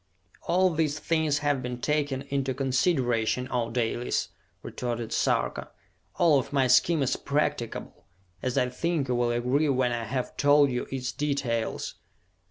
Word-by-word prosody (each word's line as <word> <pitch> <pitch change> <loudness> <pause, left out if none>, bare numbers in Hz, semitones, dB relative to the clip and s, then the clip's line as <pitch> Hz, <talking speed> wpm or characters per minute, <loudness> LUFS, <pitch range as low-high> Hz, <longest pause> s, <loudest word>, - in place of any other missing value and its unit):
"All 185 +1 +3
these 155 -2 0
things 160 -3 +1
have 145 -2 +1
been 125 -1 -5
taken 145 -1 -1
into 135 -2 -1
consideration, 130 -3 +1
O 120 -2 0
Dalis!" 120 0 -1 0.3
retorted 120 -2 -4
Sarka. - - 0 0.5
"All 160 -5 +4
of - - -5
my 135 -2 +2
scheme 140 +5 +4
is 130 - +1
practicable, 140 -4 -3 0.4
as 130 -1 -2
I 125 - +2
think 150 +1 -1
you - - +2
will 120 0 +1
agree 125 +6 +1
when 130 -2 +2
I 120 -1 -2
have 125 +3 -3
told 145 -1 +5
you 125 - -2
its 130 -1 -3
details. 140 -6 -2
130 Hz, 150 wpm, -27 LUFS, 125-145 Hz, 0.5 s, told